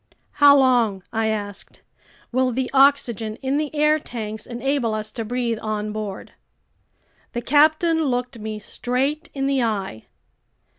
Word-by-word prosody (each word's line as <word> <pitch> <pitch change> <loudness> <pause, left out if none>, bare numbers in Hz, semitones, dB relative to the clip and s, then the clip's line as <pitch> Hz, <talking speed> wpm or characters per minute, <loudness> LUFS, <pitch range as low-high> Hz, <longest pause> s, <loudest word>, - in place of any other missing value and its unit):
"How 285 -1 +6
long," 240 -8 +2
I 225 0 0
asked, 205 -2 -5 0.5
"will 255 +1 +1
the 255 +1 -2
oxygen 255 -6 +3
in 270 +2 0
the 305 -1 -2
air 300 +1 +3
tanks 220 -5 -6
enable 245 -1 -1
us 215 0 -4
to 230 - -4
breathe 235 0 -2
on 215 -1 -3
board?" 210 -3 -6 1.0
The 240 - -2
captain 310 +4 +3
looked 250 -2 -2
me 215 0 -5
straight 260 +8 -2
in 270 -1 -1
the 275 -1 +1
eye. 200 - -3
245 Hz, 140 wpm, -22 LUFS, 215-275 Hz, 1.0 s, How